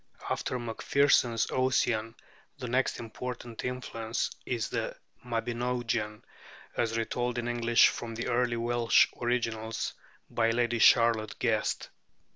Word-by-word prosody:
After 125 - -1
Macpherson's 120 0 +2
'Ossian' 120 -3 +1 0.4
the 125 - -5
next 130 +2 0
important 120 0 -6
influence 120 -3 -3 0.2
is 120 -3 -1
the - - -3 0.3
'Mabinogion,' 120 -2 -2 0.5
as 115 -1 0
retold 120 +1 -1
in 120 0 -2
English 120 -1 +4
from 115 -1 -6
the 115 - -3
early 120 -1 +1
Welsh 120 0 +4 0.2
originals 115 -2 -1 0.3
by 115 -1 +1
Lady 120 0 +1
Charlotte 115 -2 +4
Guest. 110 -3 0
120 Hz, 110 wpm, -29 LUFS, 115-120 Hz, 0.5 s, English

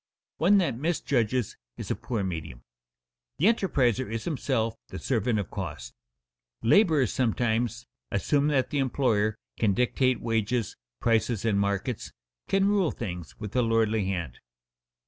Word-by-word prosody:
One 185 +6 +5
that 170 -11 +1
misjudges 130 - 0 0.2
is - - -5
a - - +1
poor 115 -5 -3
medium. 80 -9 -5 0.7
The 165 - +1
enterpriser 130 - +2
is 115 0 -3
himself 130 -8 -1
the - - -7
servant 115 -2 0
of 100 -5 -3
costs. 75 - -6 0.7
Laborers 150 - +4
sometimes 120 -1 0 0.2
assume 145 0 +1
that 135 -4 +1
the 145 - 0
employer 115 -5 +1 0.2
can 105 -4 +2
dictate 125 0 +2
wages, 115 0 -1 0.3
prices, 115 -1 +1
and 105 -3 +2
markets, 100 +4 -2 0.4
can 195 0 +3
rule 200 -5 +3
things 90 -7 -6
with 105 0 -7
a 125 - +4
lordly 110 -2 +2
hand. 90 -10 -3
115 Hz, 135 wpm, -27 LUFS, 105-135 Hz, 0.7 s, One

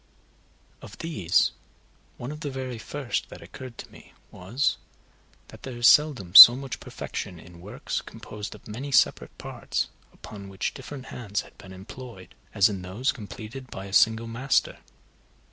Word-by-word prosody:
Of - - -12
these 100 - +1 0.7
one 120 +4 -6
of 150 - -8
the 150 -2 -4
very 130 -3 -6
first 135 +2 -4
that - - -11
occurred 130 -3 -11
to - - -10
me - - -17 0.2
was, 115 +10 -1 0.7
that - - -14
there 130 -2 -8
is 120 +1 +4
seldom 135 - +4
so 120 +4 +13
much 135 -2 -6
perfection 90 -4 -7
in 85 +1 -15
works 115 +10 -5
composed 105 -2 -9
of - - -16
many 125 +7 -6
separate 120 - +2
parts, - - -4 0.2
upon 100 -2 -11
which 95 0 -3
different 135 -3 -9
hands 105 -4 -3
had - - -17
been 95 -2 -12
employed, 95 +1 -11 0.2
as 100 - +4
in 100 -3 -5
those 95 +9 -1
completed 115 +4 -9
by 95 - -8
a 100 - -10
single 110 +2 +4
master. 125 +4 0
115 Hz, 160 wpm, -26 LUFS, 100-130 Hz, 0.7 s, so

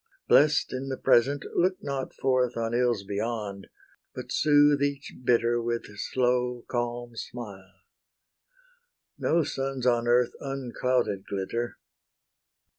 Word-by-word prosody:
Blest 150 0 +4
in 130 +1 -4
the 130 - -3
present, 135 +4 +3
look 185 +2 +2
not 135 -2 -3
forth 130 -2 0
On 115 0 -2
ills 120 -4 +1
beyond, 100 -1 -4 0.5
but - - -7
soothe 145 -1 +4
each 140 0 -2
bitter 120 -1 +2
With 115 0 -2
slow, 125 +2 0
calm 120 -1 -3
smile. 95 -6 -9 1.4
No 165 0 +2
suns 135 -2 -3
on 120 -1 +2
earth 120 0 +3
Unclouded 125 -6 -1
glitter. 110 +5 -3
120 Hz, 115 wpm, -27 LUFS, 115-135 Hz, 1.4 s, Blest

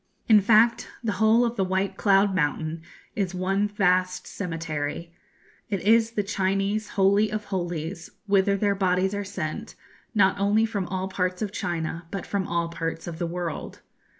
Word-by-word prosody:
In 215 -4 +7
fact 225 +3 +4 0.2
the 225 - 0
whole 225 +3 +5
of 235 0 -3
the 195 - +2
White 190 +1 -1
Cloud 195 0 +3
Mountain 155 -1 -1 0.3
is 190 -3 -1
one 195 +3 +1
vast 185 -2 +1
cemetery 165 -2 -4 0.6
it 200 -2 -1
is 225 +2 +3
the 205 - 0
Chinese 195 +2 -1
Holy 200 +2 +4
of 215 -1 -3
Holies, 175 -2 -4 0.2
whither 200 0 +3
their 200 0 +2
bodies 190 0 +1
are 205 0 -2
sent, 200 +2 -5 0.4
not 195 -2 +3
only 205 +3 +3
from 200 -5 -3
all 185 0 -3
parts 185 +1 -2
of 205 - -3
China, 165 -3 -3
but 195 -1 -5
from 195 -2 -2
all 170 -1 0
parts 165 -1 -4
of 170 -1 -7
the 170 - -1
world. 170 -2 -5
190 Hz, 165 wpm, -25 LUFS, 175-205 Hz, 0.6 s, In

